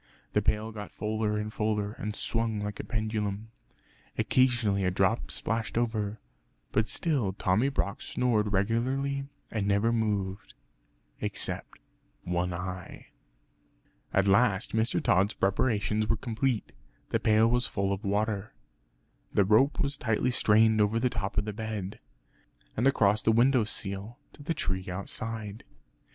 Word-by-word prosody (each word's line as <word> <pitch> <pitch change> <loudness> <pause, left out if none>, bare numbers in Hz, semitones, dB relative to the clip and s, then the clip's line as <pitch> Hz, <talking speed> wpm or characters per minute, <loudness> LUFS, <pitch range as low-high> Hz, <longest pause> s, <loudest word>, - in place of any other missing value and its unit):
The - - +3
pail 110 +1 0
got 105 -1 -7
fuller 105 0 -1
and 105 +1 -3
fuller, 105 -1 0
and 105 0 -5
swung 115 -2 -1
like 105 0 -4
a - - -3
pendulum. 110 -1 -2 0.7
Occasionally 120 -6 +2
a 90 - +3
drop 95 +5 +1
splashed 115 0 -2
over; 110 -3 -1 0.5
but 110 +1 +2
still 135 - 0
Tommy 100 +7 +2
Brock 105 -7 -2
snored 110 -5 +1
regularly 130 +7 0 0.3
and 105 -3 -1
never 100 +3 +3
moved, 100 -4 -2 0.6
except - - -4 0.5
one 90 +1 -1
eye. 90 +1 -6 1.0
At 95 0 +2
last 100 +1 +3
Mr. 110 +1 +1
Tod's 95 +4 +3
preparations 105 +1 +1
were 115 - +2
complete. 115 +1 -1 0.4
The - - +1
pail 110 +1 +4
was 120 +1 +2
full 100 0 0
of 100 +3 -5
water; 105 0 -1 0.8
the 100 - +3
rope 110 +8 +4
was 140 -1 -1
tightly 110 +3 +1
strained 110 -1 +4
over 105 +2 +2
the 125 +1 +1
top 100 -3 -3
of 105 - +2
the 105 - -3
bed, 110 -1 -5 0.8
and 120 +5 +2
across 105 -6 +3
the 110 - +3
window 120 +1 +4
sill 100 +2 -4 0.2
to - - -14
the 165 +3 -2
tree 95 0 -2
outside. 105 +3 -5
110 Hz, 140 wpm, -29 LUFS, 100-115 Hz, 1.0 s, pail